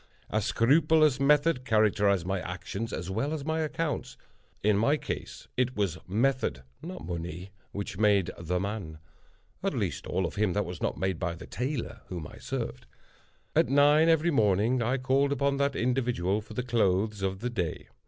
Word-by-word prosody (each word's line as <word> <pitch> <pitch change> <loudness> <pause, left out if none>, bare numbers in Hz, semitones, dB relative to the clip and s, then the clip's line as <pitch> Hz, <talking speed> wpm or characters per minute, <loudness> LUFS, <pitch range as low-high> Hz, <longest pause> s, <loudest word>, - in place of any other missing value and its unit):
A - - +1
scrupulous 150 +2 +4
method 145 0 +3
characterized 105 -5 +3
my 95 +1 -1
actions 95 +5 -5
as 90 +1 -4
well 135 +10 -1
as 145 -3 -4
my 160 +1 0
accounts. 155 0 -2 0.5
In 105 0 +4
my 115 +9 +3
case - - -6
it 130 0 0
was 100 -6 -1
method—not 125 - -2
money—which 90 +3 -6
made 100 -4 +3
the 90 +2 -2
man: 95 -5 -4 0.6
at - - -1
least - - -2
all 95 - 0
of 85 - -5
him 105 -3 +2
that 105 - 0
was 90 -2 -7
not - - -1
made 95 0 -1
by 90 -2 -2
the - - -10
tailor 125 -2 -4
whom 85 -4 -5
I - - -13
served. 65 - -4 0.7
At - - +4
nine, 145 +4 +5
every 165 +1 +3
morning, 110 - +3
I 125 +4 +1
called 135 +2 +2
upon 140 0 +1
that 140 -1 +1
individual 120 -6 0
for 105 0 -12
the 125 - -1
clothes 105 -3 +1
of 95 0 -2
the 125 +1 -2
day. 90 -8 -3
110 Hz, 170 wpm, -29 LUFS, 95-135 Hz, 0.7 s, nine